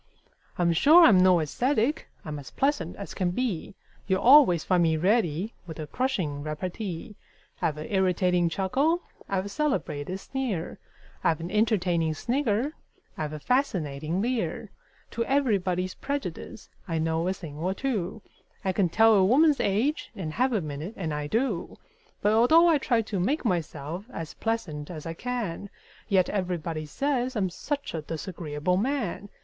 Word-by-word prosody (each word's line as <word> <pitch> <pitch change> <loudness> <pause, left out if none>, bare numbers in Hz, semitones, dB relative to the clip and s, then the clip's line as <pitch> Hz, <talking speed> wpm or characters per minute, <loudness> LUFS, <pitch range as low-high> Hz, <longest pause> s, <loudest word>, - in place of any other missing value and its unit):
I'm 170 -1 +2
sure 315 - +7
I'm 200 - +7
no 185 -1 +5
ascetic: 255 - 0 0.2
I'm 150 -2 -5
as 140 - -10
pleasant 275 - -1
as 200 - -7
can 185 -2 0
be; 200 -2 -2 0.3
You'll 190 -1 +1
always 245 - +7
find 180 -2 +2
me 160 -2 +3
ready 190 +1 +1
with 160 - -7
a 155 - -3
crushing 180 - -2
repartee; 180 +6 -5 0.5
I've 150 -2 0
an 155 - -5
irritating 180 -3 +2
chuckle; 275 - +1 0.3
I've 190 -1 0
a - - -5
celebrated 195 - -2
sneer; 240 -9 -4 0.4
I've 160 - +2
an 170 +2 -6
entertaining 180 -7 +1
snigger; 250 - 0 0.4
I've 155 -1 -3
a 155 - -6
fascinating 170 - 0
leer; 240 -1 -2 0.4
To 230 - -1
everybody's 195 -9 +1
prejudice 265 - -5 0.2
I 165 -2 -1
know 160 +2 0
a 185 - +1
thing 160 -6 -9
or 185 +4 -1
two; 215 -5 -3 0.4
I 190 - +2
can 185 -1 +1
tell 225 +5 +5
a 195 -3 +5
woman's 285 +8 +4
age 225 +10 0
in 165 -5 -4
half 255 +10 +1
a 215 -5 +1
minute 155 +7 -6
and 160 -5 -3
I 150 0 -3
do 225 - -1 0.5
But 210 +1 +4
although 315 +10 +6
I 320 -4 +4
try 235 -4 +1
to 205 -3 -3
make 265 - 0
myself 170 -1 -2
as 165 -9 -6
pleasant 165 -11 -3
as 160 -4 -7
I 165 - -4
can, 205 -3 -4 0.4
Yet 190 -3 +4
everybody 170 -5 -3
says 260 - -1
I'm 190 -4 0
such 285 - -4
a 160 - -3
disagreeable 160 +1 -3
man! 215 -4 -2
190 Hz, 160 wpm, -27 LUFS, 165-240 Hz, 0.5 s, sure